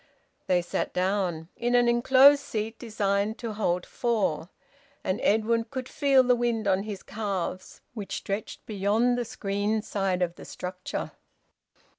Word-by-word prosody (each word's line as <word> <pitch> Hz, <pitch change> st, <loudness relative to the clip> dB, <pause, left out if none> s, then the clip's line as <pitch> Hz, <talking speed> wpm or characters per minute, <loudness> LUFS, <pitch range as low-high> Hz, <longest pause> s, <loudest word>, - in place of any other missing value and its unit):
They 180 Hz, -1 st, +2 dB
sat 175 Hz, -, -2 dB
down, 180 Hz, -3 st, -1 dB
in 240 Hz, +1 st, 0 dB
an 245 Hz, 0 st, +5 dB
enclosed 260 Hz, +4 st, +6 dB
seat 220 Hz, +1 st, -4 dB
designed 210 Hz, -1 st, -1 dB
to 230 Hz, -3 st, -5 dB
hold 180 Hz, -4 st, 0 dB
four. 210 Hz, -9 st, -1 dB, 0.5 s
And 185 Hz, +1 st, -1 dB
Edwin 225 Hz, +2 st, +2 dB
could 260 Hz, -1 st, -6 dB
feel 275 Hz, -3 st, +4 dB
the 250 Hz, 0 st, +4 dB
wind 235 Hz, -3 st, 0 dB
on 190 Hz, 0 st, +3 dB
his 205 Hz, -2 st, -6 dB
calves, 195 Hz, -4 st, -4 dB
which 200 Hz, -4 st, -5 dB
stretched 200 Hz, +2 st, -5 dB
beyond 215 Hz, +4 st, +1 dB
the 245 Hz, -1 st, -2 dB
screened 210 Hz, +1 st, -2 dB
side 190 Hz, -3 st, 0 dB
of 175 Hz, -1 st, -3 dB
the -, -, -10 dB
structure. 180 Hz, 0 st, -5 dB
210 Hz, 145 wpm, -27 LUFS, 190-235 Hz, 0.5 s, enclosed